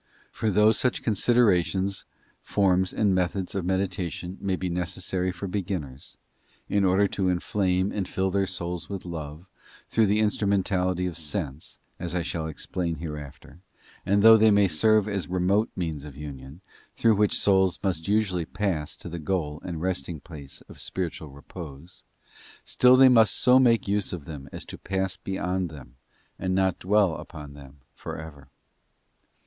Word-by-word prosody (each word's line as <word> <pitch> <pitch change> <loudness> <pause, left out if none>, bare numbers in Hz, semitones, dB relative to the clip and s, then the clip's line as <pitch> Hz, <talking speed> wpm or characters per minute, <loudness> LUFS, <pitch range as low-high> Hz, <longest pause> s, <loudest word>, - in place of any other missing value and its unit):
For 110 - -1
though 105 +2 +5
such 125 +3 0
considerations, 100 -4 +2 0.4
forms, 95 -2 +2
and 100 -3 +2
methods 90 +1 -1
of 95 -3 -2
meditation 95 -1 -2
may 95 -1 0
be 90 - -3
necessary 90 +1 -2
for 90 +2 -7
beginners, 90 -9 -5 0.5
in 100 -1 +1
order 95 +2 +4
to 95 -2 0
inflame 90 +1 0
and 100 -3 -3
fill 95 0 -1
their 100 0 +1
souls 90 -2 -4
with 100 -3 -6
love, 80 -1 -7 0.4
through 110 -2 +3
the 105 +2 +2
instrumentality 95 -4 +1
of 85 -2 -4
sense, 75 -2 -5 0.2
as 90 0 -4
I 90 - 0
shall 80 -1 -3
explain 85 +2 -3
hereafter—and 80 +6 -5
though 110 0 +9
they 110 0 +5
may 100 -1 +5
serve 105 +5 +3
as 100 -3 -2
remote 95 +4 +1
means 80 -5 -3
of 70 -2 -10
union, 70 +2 -9 0.3
through 115 -1 +4
which 105 0 +2
souls 95 -2 +3
must 85 -5 -1
usually 100 -5 +1
pass 85 -6 -2
to - - -10
the 85 0 -5
goal 75 -3 -2
and 85 -2 -5
resting 85 -3 -2
place 70 -3 -10
of - - -14
spiritual 85 -4 -4
repose— 70 +3 -10 0.6
still 125 0 +5
they 130 0 +8
must 115 -5 +5
so 125 +1 +5
make 115 -5 +3
use 100 -1 0
of 85 -6 -6
them 70 -3 -8
as - - -7
to - - -9
pass 95 0 -2
beyond 95 -1 -2
them, 65 -5 -13 0.4
and 95 0 -1
not 95 -1 +1
dwell 100 -2 +3
upon 75 -2 -10
them 70 -1 -14
for - - -7
ever. 75 -4 -10
90 Hz, 160 wpm, -26 LUFS, 80-100 Hz, 0.6 s, though